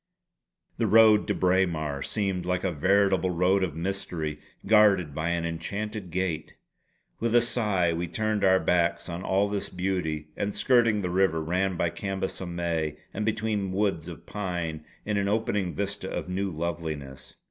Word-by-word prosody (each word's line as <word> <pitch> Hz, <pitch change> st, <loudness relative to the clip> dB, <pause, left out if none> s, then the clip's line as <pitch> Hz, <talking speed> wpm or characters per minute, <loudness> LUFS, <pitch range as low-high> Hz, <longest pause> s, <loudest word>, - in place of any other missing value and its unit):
The -, -, +2 dB
road 110 Hz, -1 st, +6 dB
to -, -, 0 dB
Braemar 85 Hz, -6 st, +1 dB
seemed 95 Hz, -2 st, -1 dB
like 90 Hz, 0 st, -1 dB
a 95 Hz, -, +1 dB
veritable 95 Hz, +3 st, +2 dB
road 90 Hz, +2 st, +2 dB
of 80 Hz, -5 st, -2 dB
mystery, 80 Hz, -4 st, -3 dB, 0.3 s
guarded 100 Hz, -7 st, +4 dB
by 80 Hz, +3 st, -2 dB
an 85 Hz, -1 st, -1 dB
enchanted 100 Hz, +4 st, -4 dB
gate. 85 Hz, -3 st, -2 dB, 0.6 s
With 115 Hz, 0 st, 0 dB
a -, -, +8 dB
sigh 105 Hz, -8 st, +1 dB
we 85 Hz, +1 st, -2 dB
turned 110 Hz, +3 st, -1 dB
our 95 Hz, -1 st, +5 dB
backs 85 Hz, -1 st, +1 dB
on 85 Hz, +1 st, -4 dB
all 95 Hz, +2 st, +1 dB
this 100 Hz, -1 st, -2 dB
beauty, 90 Hz, -5 st, -2 dB
and 100 Hz, 0 st, -2 dB
skirting 115 Hz, -5 st, +3 dB
the 90 Hz, -, -1 dB
river, 90 Hz, -3 st, +2 dB
ran 90 Hz, +3 st, 0 dB
by 85 Hz, -1 st, +1 dB
Cambus 95 Hz, -1 st, -4 dB
o 95 Hz, -, -4 dB
May 85 Hz, -3 st, -2 dB, 0.2 s
and 105 Hz, +2 st, -2 dB
between 105 Hz, -3 st, -1 dB
woods 95 Hz, -5 st, 0 dB
of 85 Hz, -1 st, -9 dB
pine 85 Hz, -6 st, -4 dB, 0.2 s
in 105 Hz, -1 st, 0 dB
an 100 Hz, 0 st, +1 dB
opening 100 Hz, -3 st, 0 dB
vista 100 Hz, -1 st, -3 dB
of -, -, -4 dB
new 95 Hz, +2 st, -1 dB
loveliness. 80 Hz, -5 st, -5 dB
95 Hz, 165 wpm, -27 LUFS, 85-100 Hz, 0.6 s, a